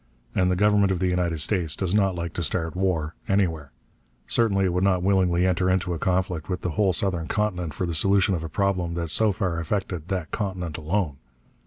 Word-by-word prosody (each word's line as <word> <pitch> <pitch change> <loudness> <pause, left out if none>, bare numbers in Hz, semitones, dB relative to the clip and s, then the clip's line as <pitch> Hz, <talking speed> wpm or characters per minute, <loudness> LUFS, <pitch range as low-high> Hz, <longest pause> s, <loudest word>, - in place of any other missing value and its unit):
And 90 -1 +2
the 90 - +2
government 105 0 +3
of 95 - +1
the 90 +1 0
United 90 -3 0
States 85 -3 0
does 95 -1 -1
not 100 -3 +2
like 85 -1 -4
to - - -3
start 80 +2 -1
war, 85 -4 0
anywhere. 85 -8 0 0.5
Certainly 100 -5 +2
it 90 - 0
would 90 +1 +1
not 90 -2 +2
willingly 90 -2 +2
enter 95 0 +1
into 90 -1 0
a 85 - -4
conflict 90 -4 -1
with 90 - -2
the 90 - -2
whole 100 +2 +2
southern 85 -1 0
continent 90 -7 -2
for 90 - -2
the 85 - -3
solution 100 +3 +3
of 85 -3 -2
a 80 - -5
problem 90 -1 -1
that 85 -1 -3
so 110 +5 +3
far 90 -4 -2
affected 90 -2 -3
that 90 -4 -3
continent 90 -6 -3
alone. 80 -2 -1
90 Hz, 210 wpm, -25 LUFS, 85-95 Hz, 0.5 s, government